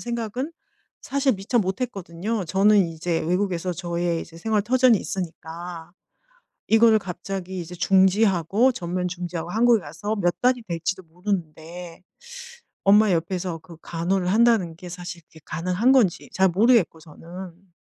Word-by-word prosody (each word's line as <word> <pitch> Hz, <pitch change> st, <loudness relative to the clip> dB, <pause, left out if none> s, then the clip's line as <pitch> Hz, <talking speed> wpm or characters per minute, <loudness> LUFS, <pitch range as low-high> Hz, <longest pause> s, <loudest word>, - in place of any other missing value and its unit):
생각은 240 Hz, +5 st, -4 dB, 0.5 s
사실 275 Hz, 0 st, +1 dB
미처 195 Hz, +5 st, -1 dB
못했거든요. 195 Hz, -1 st, -3 dB
저는 195 Hz, +1 st, +4 dB
이제 165 Hz, +1 st, -2 dB
외국에서 180 Hz, +1 st, -1 dB
저의 170 Hz, -1 st, -2 dB
이제 165 Hz, -, -13 dB
생활 215 Hz, +2 st, 0 dB
터전이 250 Hz, 0 st, +4 dB
있으니까 170 Hz, -2 st, -6 dB, 0.8 s
이거를 225 Hz, 0 st, +6 dB
갑자기 185 Hz, 0 st, -6 dB
이제 175 Hz, +1 st, -8 dB
중지하고 195 Hz, +4 st, +3 dB
전면 180 Hz, -3 st, -3 dB
중지하고 175 Hz, -1 st, -5 dB
한국에 230 Hz, 0 st, +4 dB
가서 170 Hz, +8 st, -4 dB
몇 175 Hz, -3 st, +1 dB
달이 250 Hz, -1 st, +2 dB
될지도 170 Hz, +2 st, -3 dB
모르는데 170 Hz, -1 st, -5 dB, 0.8 s
엄마 205 Hz, +1 st, +5 dB
옆에서 175 Hz, 0 st, -2 dB
그 165 Hz, 0 st, -14 dB
간호를 180 Hz, +2 st, -1 dB
한다는 215 Hz, -5 st, +3 dB
게 180 Hz, +1 st, -10 dB
사실 175 Hz, -1 st, -7 dB
그게 160 Hz, -, -18 dB
가능한 180 Hz, +9 st, +1 dB
건지 225 Hz, -10 st, +2 dB
잘 190 Hz, 0 st, +3 dB
모르겠고 205 Hz, -2 st, +3 dB
저는 175 Hz, +3 st, -12 dB
185 Hz, 320 characters per minute, -24 LUFS, 170-215 Hz, 0.8 s, 이거를